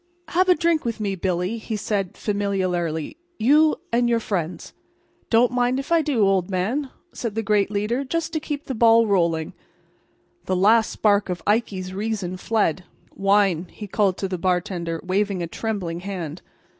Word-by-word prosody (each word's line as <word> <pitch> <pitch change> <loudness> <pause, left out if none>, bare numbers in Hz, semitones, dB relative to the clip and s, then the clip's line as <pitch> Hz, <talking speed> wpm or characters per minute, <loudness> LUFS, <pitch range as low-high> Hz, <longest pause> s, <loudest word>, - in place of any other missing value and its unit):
"Have 370 +2 +2
a 360 - +7
drink 335 -1 +1
with 230 -2 -3
me, 205 -2 -1
Billy," 185 +3 -1
he 220 0 -4
said 200 -3 -2
familiarly, 185 - -1 0.2
"you 300 +7 +4 0.2
and 240 0 +3
your 235 -1 +2
friends?" 180 -6 -4 0.6
"Don't 235 +1 +4
mind 250 +1 +1
if 275 - -7
I 335 -1 +5
do, 270 -9 +2
old 190 -2 +1
man," 220 +10 -1 0.2
said 230 -4 -4
the 225 - -1
great 205 -1 +2
leader, 210 +6 -1
"just 330 +4 -3
to 315 - 0
keep 295 -1 -5
the 265 - -3
ball 230 0 +5
rolling." 170 -6 +1 0.9
The 185 - 0
last 215 +4 +4
spark 205 -2 +2
of 175 -2 -4
Ikey's 195 -4 0
reason 200 -3 -3
fled. 190 -5 0 0.3
"Wine," 195 -3 +2
he 210 - -9
called 195 -2 +1
to 195 - -2
the 185 -2 -4
bartender, 175 -2 -1
waving 190 0 0
a - - -1
trembling 180 -3 -3
hand. 180 -4 -5
205 Hz, 170 wpm, -23 LUFS, 185-230 Hz, 0.9 s, a